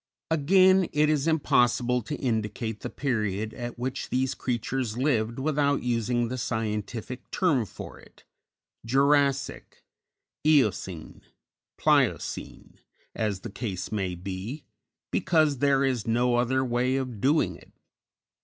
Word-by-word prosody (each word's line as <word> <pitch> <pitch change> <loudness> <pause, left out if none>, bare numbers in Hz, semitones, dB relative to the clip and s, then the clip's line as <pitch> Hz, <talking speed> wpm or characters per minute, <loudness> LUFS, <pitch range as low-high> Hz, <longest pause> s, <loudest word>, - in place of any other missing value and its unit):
_ - - +4
_Again, 185 +4 +4
it 150 +1 +3
is 150 0 0
impossible 125 -5 +2
to 120 +7 -5
indicate 110 -3 -2
the - - -5
period 110 -5 -2
at 120 0 -6
which 130 +2 -4
these 130 +1 0
creatures 120 -1 -2
lived 120 -4 0
without 145 0 +1
using 120 0 0
the 130 +2 -4
scientific 110 +1 -4
term 140 - +1
for - - -10
it - - -19 0.6
Jurassic, 140 +3 +1 0.6
Eocene, 110 - +1 0.6
Pliocene, - - 0 0.3
as 105 -4 -2
the 120 - -7
case 100 -5 -5
may 95 -4 -2
be 95 - -6 0.5
because 155 -5 +2
there 140 -1 +3
is 125 -5 -1
no 120 +2 +2
other 130 +2 +1
way 125 +1 +1
of 130 -6 -3
doing 150 +4 +2
it. - - -17
125 Hz, 125 wpm, -27 LUFS, 110-140 Hz, 0.6 s, _